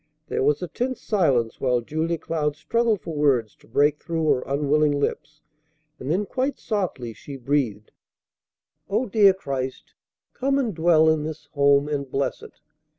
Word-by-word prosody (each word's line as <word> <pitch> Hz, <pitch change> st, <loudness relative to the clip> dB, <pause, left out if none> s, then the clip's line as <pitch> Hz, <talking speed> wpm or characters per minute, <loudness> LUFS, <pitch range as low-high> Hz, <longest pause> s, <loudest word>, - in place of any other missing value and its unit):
There -, -, -1 dB
was 145 Hz, +5 st, +2 dB
a -, -, -2 dB
tense 255 Hz, +7 st, -3 dB
silence 135 Hz, -, +1 dB
while 125 Hz, -2 st, +2 dB
Julia 160 Hz, +6 st, -2 dB
Cloud 150 Hz, -2 st, -2 dB
struggled 230 Hz, -4 st, 0 dB
for 165 Hz, -, -6 dB
words 130 Hz, -8 st, +1 dB
to -, -, -23 dB
break 145 Hz, +5 st, +2 dB
through 165 Hz, -2 st, -2 dB
her 125 Hz, -, +2 dB
unwilling 145 Hz, +1 st, +2 dB
lips, 150 Hz, +1 st, -3 dB, 0.6 s
and 130 Hz, -, -6 dB
then 190 Hz, +6 st, +1 dB
quite 265 Hz, +7 st, -2 dB
softly 180 Hz, -, -3 dB
she 140 Hz, +6 st, -10 dB
breathed: 120 Hz, -6 st, -1 dB, 1.0 s
"O 215 Hz, +6 st, +1 dB
dear 205 Hz, -2 st, +5 dB
Christ, 135 Hz, -7 st, -5 dB, 0.4 s
come 275 Hz, +1 st, 0 dB
and 245 Hz, -6 st, 0 dB
dwell 160 Hz, -1 st, +4 dB
in 160 Hz, -1 st, +3 dB
this 155 Hz, 0 st, -6 dB
home, 140 Hz, -1 st, +3 dB
and 140 Hz, -2 st, -3 dB
bless 135 Hz, +1 st, -2 dB
it. -, -, -14 dB
150 Hz, 160 wpm, -24 LUFS, 140-180 Hz, 1.0 s, dear